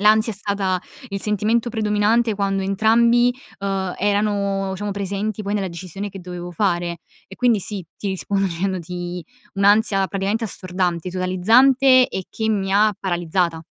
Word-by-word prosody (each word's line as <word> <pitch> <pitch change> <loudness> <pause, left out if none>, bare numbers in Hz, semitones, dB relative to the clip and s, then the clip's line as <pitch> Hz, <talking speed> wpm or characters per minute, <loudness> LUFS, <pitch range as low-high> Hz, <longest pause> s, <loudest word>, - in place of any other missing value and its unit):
L'ansia 215 +2 +4
è - - -7
stata 195 -2 -1 0.3
il 195 0 -4
sentimento 220 +3 0
predominante 220 +1 +1
quando 195 -1 -1
entrambi, 235 +5 +3 0.2
uhm, 195 -2 -2
erano 200 -1 0
diciamo 205 +1 -4
presenti 200 +2 -3
poi 200 - -3
nella 195 -3 -1
decisione 185 +4 -6
che 195 -1 -9
dovevo 175 0 -7
fare 175 -3 -1 0.3
e 195 - -11
quindi, 235 -5 +2
sì, 195 -2 -3
ti 200 - -3
rispondo 195 +1 -1
dicendoti 180 -1 -4 0.3
un'ansia 200 0 +3
praticamente 200 +5 -1
assordante, 180 -3 -2
totalizzante 250 +9 +4
e 190 - -4
che 220 0 -2
mi 195 -3 0
ha 210 0 +4
paralizzata. 175 -2 -1
195 Hz, 145 wpm, -21 LUFS, 185-215 Hz, 0.3 s, L'ansia